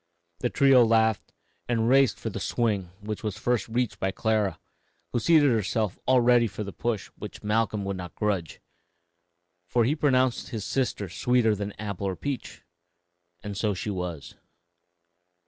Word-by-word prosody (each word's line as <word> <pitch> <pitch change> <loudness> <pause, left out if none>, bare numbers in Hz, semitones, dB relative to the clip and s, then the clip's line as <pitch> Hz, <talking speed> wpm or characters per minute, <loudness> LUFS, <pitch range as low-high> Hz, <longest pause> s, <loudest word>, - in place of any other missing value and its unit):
The 125 - 0
trio 135 -2 +5
laughed 110 -1 +2 0.4
and 115 -2 +1
raced 135 0 +4
for - - -5
the - - -5
swing, 105 -5 0 0.2
which 105 0 -5
was 105 -4 -3
first 120 -5 0
reached 120 +1 -1
by 95 - 0
Clara, 105 0 0 0.5
who 120 - +2
seated 150 0 +5
herself 110 -2 0
all 130 -1 +5
ready 120 -1 +4
for 105 +1 -6
the 100 - -7
push 115 -5 -2
which - - -8
Malcolm 105 -1 0
would 100 -1 -3
not 90 -1 -8
grudge, 100 -7 -2 1.1
for 120 +5 +2
he 135 +7 +2
pronounced 130 -5 +1
his 110 -5 -5
sister 125 -6 -1
sweeter 115 +5 +2
than 100 0 -4
apple 100 -2 -4
or 95 - -2
peach; 140 +2 -5 0.8
and 105 -1 -5
so 105 0 0
she 105 +3 -3
was. 90 -6 -5
110 Hz, 160 wpm, -27 LUFS, 100-125 Hz, 1.1 s, trio